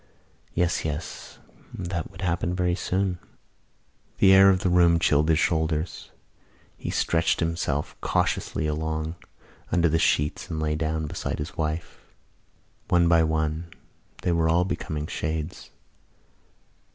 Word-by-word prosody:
Yes, 90 0 +1
yes: 80 +1 -5 0.3
that 85 -2 -4
would 95 - -12
happen 85 0 0
very 90 -1 +1
soon. 90 0 -1 1.0
The 95 - +6
air 95 0 +8
of 95 -1 +3
the 95 - +1
room 85 -1 +5
chilled 75 -1 +2
his 80 - +4
shoulders. 80 0 -1 0.7
He - - -6
stretched 80 -1 +1
himself 80 -3 -1
cautiously 80 - 0
along 80 +1 -2 0.6
under 85 -1 +3
the 80 +1 +2
sheets 75 -1 +1
and 80 - -3
lay 75 0 0
down 80 0 -1
beside 75 - -4
his 75 +3 -6
wife. 80 +1 -3 0.9
One 85 -1 +4
by 85 -1 +5
one 80 +1 0 0.6
they 90 - +1
were 80 -1 +2
all 85 +2 +3
becoming 75 -5 -3
shades. 80 +2 -4
80 Hz, 130 wpm, -25 LUFS, 80-85 Hz, 1.0 s, air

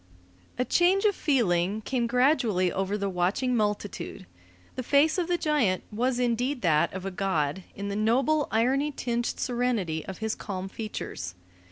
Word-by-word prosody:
A 250 - +1
change 375 +7 +3
of 415 - +4
feeling 205 - +1
came 240 +2 -1
gradually 240 - +2
over 195 +2 -1
the 200 -1 -1
watching 195 +8 0
multitude. 205 - -2 0.5
The 255 - -4
face 290 +7 +3
of 345 - 0
the 350 -1 +1
giant 285 - +1
was 245 +4 0
indeed 245 +2 0
that 155 -4 +3
of 190 0 -6
a 195 - -2
god 180 -3 -1
in 200 +1 -4
the 200 - -3
noble, 260 +8 +2
irony 265 +6 +2
tinged 240 -3 -2
serenity 235 -10 -1
of 190 - -6
his 220 0 -2
calm 190 -2 -5
features. 140 - -6
225 Hz, 160 wpm, -27 LUFS, 190-260 Hz, 0.5 s, of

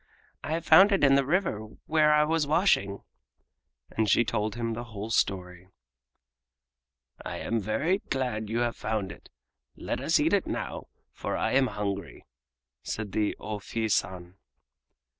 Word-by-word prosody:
"I 160 +2 -1
found 195 +5 +7
it 195 -6 +2
in 140 -1 +6
the 140 0 +4
river 160 - 0 0.3
where 155 -1 +3
I 150 0 +5
was 155 -1 0
washing." 145 - +2 0.9
And 110 -1 0
she 120 - +4
told 105 -1 -2
him 115 -1 -2
the 120 +2 -5
whole 110 -1 -7
story. 90 -4 -1 1.6
"I - - -5
am 115 - -1
very 140 - 0
glad 125 -5 -2
that - - -8
you 115 +1 0
have 120 -1 0
found 105 -4 -3
it. - - -14 0.5
Let - - -4
us - - +2
eat - - +2
it - - +2
now, - - -4 0.2
for - - -4
I - - 0
am 135 0 +3
hungry," 100 -3 -5 0.6
said 105 - -5
the 105 +1 0
O 105 -1 -5
Fii 110 +1 -3
San. 90 -1 -2
115 Hz, 160 wpm, -28 LUFS, 105-145 Hz, 1.6 s, found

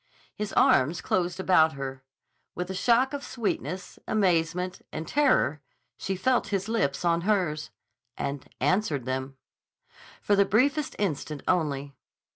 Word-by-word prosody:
His 210 -1 -4
arms 150 +6 +4
closed 175 +1 -1
about 160 -4 +4
her. 135 -1 -6 0.5
With 180 +1 -3
a - - -3
shock 240 +7 +3
of 285 -1 -4
sweetness, 190 - -4
amazement, 180 -2 +1
and 160 - -5
terror 255 - +2 0.3
she 195 - -3
felt 240 +4 +1
his 195 -1 -2
lips 200 -9 0
on 170 0 +2
hers—and 145 - -3
answered 145 - +1
them. 130 +1 -3 0.8
For 205 - +2
the 200 - +5
briefest 260 +9 +1
instant 155 -6 -2
only. 145 -5 0
180 Hz, 125 wpm, -27 LUFS, 145-205 Hz, 0.8 s, the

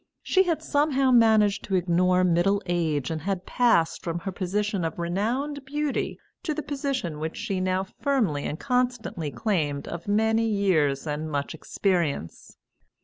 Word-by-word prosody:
She 380 - +3
had 335 -3 -1
somehow 280 -3 +2
managed 220 -4 +4
to 195 - -1
ignore 180 +1 +3
middle 180 +3 +3
age, 160 -6 0
and 160 -1 -3
had 190 +1 -2
passed 230 -10 +2
from 170 -1 -2
her 195 - -4
position 195 +1 -1
of 165 - -3
renowned 235 +12 -2
beauty 295 +1 -2 0.2
to 315 -5 -2
the 310 - -3
position 270 - -3
which 160 +1 -4
she 195 -2 -2
now 185 0 +1
firmly 210 - -1
and 155 - -4
constantly 245 - -1
claimed 150 -6 -1
of 170 +2 -6
many 220 +2 +2
years 170 -10 +1
and 155 +1 -3
much 145 0 -2
experience. 165 - -2
195 Hz, 150 wpm, -26 LUFS, 165-245 Hz, 0.2 s, managed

